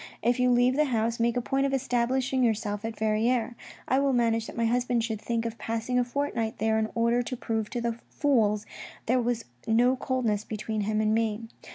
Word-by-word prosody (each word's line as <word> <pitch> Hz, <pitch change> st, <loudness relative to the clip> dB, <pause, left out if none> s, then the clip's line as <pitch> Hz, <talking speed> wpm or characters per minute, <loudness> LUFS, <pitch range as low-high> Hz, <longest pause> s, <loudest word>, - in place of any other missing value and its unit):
If 240 Hz, +2 st, +2 dB
you 250 Hz, 0 st, +4 dB
leave 245 Hz, +2 st, +3 dB
the 305 Hz, -, +4 dB
house, 230 Hz, -3 st, 0 dB
make 235 Hz, +1 st, +1 dB
a -, -, +1 dB
point 270 Hz, +2 st, +1 dB
of 275 Hz, -, 0 dB
establishing 255 Hz, +1 st, 0 dB
yourself 210 Hz, -2 st, 0 dB
at 225 Hz, -1 st, -4 dB
Verrieres; 225 Hz, +3 st, +1 dB, 0.3 s
I 260 Hz, -, +3 dB
will 275 Hz, -1 st, +2 dB
manage 230 Hz, -2 st, +1 dB
that -, -, -9 dB
my 230 Hz, -, +1 dB
husband 245 Hz, 0 st, +1 dB
should 220 Hz, -2 st, -3 dB
think 230 Hz, 0 st, -2 dB
of 230 Hz, 0 st, -4 dB
passing 230 Hz, +2 st, -1 dB
a -, -, +3 dB
fortnight 245 Hz, -3 st, -2 dB
there 220 Hz, 0 st, +1 dB
in 220 Hz, 0 st, -1 dB
order 235 Hz, +1 st, +2 dB
to 250 Hz, +1 st, -4 dB
prove 220 Hz, -2 st, -2 dB
to 240 Hz, -, -3 dB
the 235 Hz, 0 st, -2 dB
fools 220 Hz, -8 st, +1 dB, 0.4 s
there 250 Hz, +2 st, +2 dB
was 240 Hz, -1 st, -1 dB, 0.2 s
no 240 Hz, +3 st, +4 dB
coldness 245 Hz, -6 st, -1 dB
between 215 Hz, 0 st, -3 dB
him 215 Hz, +1 st, 0 dB
and 215 Hz, 0 st, +2 dB
me. 225 Hz, 0 st, 0 dB
235 Hz, 210 wpm, -27 LUFS, 220-250 Hz, 0.4 s, you